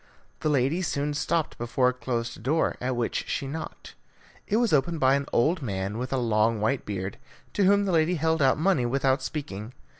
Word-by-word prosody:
The 155 - 0
lady 145 +5 +1
soon 145 -4 -1
stopped 155 +2 -1
before 120 +2 +2
a - - -2
closed 120 -3 -4
door, 150 +8 +1
at 125 0 -1
which 120 -1 -1
she - - -2
knocked. 160 +3 -7 0.5
It 210 - +1
was 235 -5 +2
opened 160 +3 +2
by 130 -1 +4
an 140 0 0
old 160 +8 +2
man 100 -2 -3
with 125 +1 -4
a 135 - +1
long 115 -2 +2
white 110 +5 0
beard, 95 +2 -4 0.3
to 200 - +2
whom 200 +1 +4
the 195 - 0
lady 165 +1 +3
held 160 0 +1
out 135 -1 +4
money 155 -7 +2
without 135 +1 +1
speaking. 125 -6 -5
135 Hz, 200 wpm, -26 LUFS, 120-160 Hz, 0.5 s, by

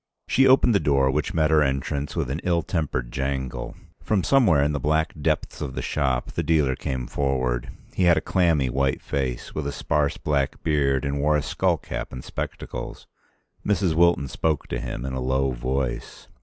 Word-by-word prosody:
She 135 0 +4
opened 130 -2 +5
the 100 - +4
door, 70 -4 +2
which 75 +4 -2
met 80 -1 +2
her 80 -1 +5
entrance 70 +1 -1
with 65 - -1
an 75 +5 -3
ill 85 -2 +1
tempered 70 -8 -2
jangle. 65 -1 -3 0.3
From 100 -4 0
somewhere 105 - +4
in 75 - +1
the 75 - -2
black 80 +2 +1
depths - - -1
of 65 -3 -4
the - - -3
shop 65 -4 -1
the - - -2
dealer 75 -5 +2
came 65 -2 -3
forward. 65 -2 -1 0.2
He 95 - +1
had 85 -2 +5
a - - +4
clammy 80 -6 +2
white 65 +1 0
face, 65 -3 -3
with 75 -2 -3
a - - -2
sparse 70 0 0
black 70 -3 -1
beard, 70 -4 +1
and 70 0 -1
wore 75 +1 +3
a 75 - -1
skull - - +1
cap - - -6
and 65 0 -7
spectacles. - - -6 0.6
Mrs. 100 -4 +1
Wilton 85 -4 +3
spoke 75 +1 -1
to - - -2
him - - -5
in 65 - -4
a 65 - -3
low 65 +1 +1
voice. 65 +1 -3
70 Hz, 195 wpm, -24 LUFS, 65-80 Hz, 0.6 s, opened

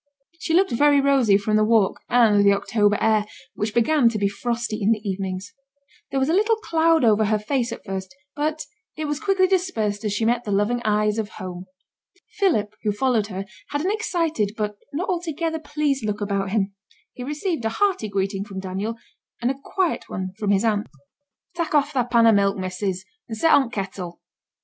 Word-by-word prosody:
She 325 - 0
looked 380 +2 +3
very 285 +4 +4
rosy 270 -7 +4
from 215 +1 +1
the 215 - +4
walk, 215 -3 +3
and 220 -4 +5
the 200 0 +6
October 205 0 +1
air, 215 -1 +2 0.3
which 210 +1 -2
began 240 +1 +4
to 225 - -3
be 200 -1 +1
frosty 230 +2 -3
in 200 - +2
the 215 -1 -6
evenings; 190 -1 -4 0.6
there 270 - -1
was 265 - +1
a 320 - +1
little 430 +4 +3
cloud 330 - +2
over 215 -1 +4
her 215 +1 +2
face 240 +3 -1
at - - -8
first, 190 -2 -5 0.2
but 305 +1 -2 0.3
it 310 - -3
was 295 0 -2
quickly 390 -1 +2
dispersed 235 - 0
as 210 - -1
she 215 +2 0
met 240 +1 +1
the 210 - -4
loving 210 +5 +1
eyes 210 0 +1
of 210 -2 -3
home. 185 -2 -7 0.7
Philip, 220 - +2
who 210 - 0
followed 220 0 +1
her, 195 -1 -5 0.2
had 290 - -2
an 370 +5 0
excited, 330 - -1
but 210 -1 -2 0.2
not 335 +6 -3
altogether 330 -3 -2
pleased 290 -3 -1
look 210 -1 -2
about 200 -2 -1
him. 200 -1 0 0.4
He 250 - -7
received 300 - -3
a 225 - +1
hearty 370 - 0
greeting 195 0 -1
from 200 -2 -7
Daniel, 195 +4 -3 0.4
and 245 +2 +1
a 270 - -7
quiet 375 -4 -1
one 185 0 -4
from 210 -2 -1
his 200 +1 +3
aunt. 210 -2 +1 0.7
'Tak' 335 -3 -2
off 290 0 +2
thy 250 -3 +1
pan 235 -2 +4
o' 225 - +7
milk, 200 -1 +2
missus, 185 0 -3 0.2
and 220 - -5
set 325 +8 +4
on 270 -4 +4
t' 245 - -10
kettle. 190 -3 -5
225 Hz, 200 wpm, -23 LUFS, 205-290 Hz, 0.7 s, o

